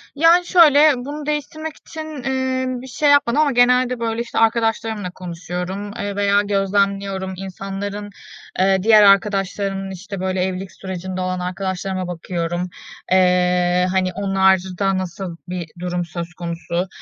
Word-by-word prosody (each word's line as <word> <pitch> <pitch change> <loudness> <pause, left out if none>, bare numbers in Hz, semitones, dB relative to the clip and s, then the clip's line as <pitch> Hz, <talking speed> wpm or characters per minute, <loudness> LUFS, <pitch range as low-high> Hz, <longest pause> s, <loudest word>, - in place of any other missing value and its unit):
Yani, 335 +4 +5
şöyle, 310 -4 +6
bunu 290 +4 -6
değiştirmek 310 +1 -4
için, 310 -5 -8
eee, 260 -1 -1 0.2
bir 260 - -10
şey 290 +4 +1
yapmadım 285 -2 +4
ama 295 -2 +3
genelde 250 0 +3
böyle, 230 0 -1
işte, 235 - -3
arkadaşlarımla 225 -3 0
konuşuyorum, 180 +3 -5
eee, 205 0 -3
veya 200 0 +3
gözlemliyorum. 195 -1 0
İnsanların, 195 +2 -5 0.5
eee, 190 +1 +4
diğer 215 -1 +7
arkadaşlarımın, 195 -1 +2
işte, 195 +1 -7
böyle 185 0 -1
evlilik 185 0 -4
sürecinde 185 0 -6
olan 185 0 -2
arkadaşlarıma 185 0 -3
bakıyorum. 175 0 -3 0.4
Eee, 180 -1 +3
hani, 185 -1 0
onlarda 190 0 +1
nasıl 180 -1 -5
bir 180 -1 -4
durum 175 0 -2
söz 170 +1 -6
konusu? 170 +1 -3
195 Hz, 130 wpm, -20 LUFS, 185-230 Hz, 0.5 s, diğer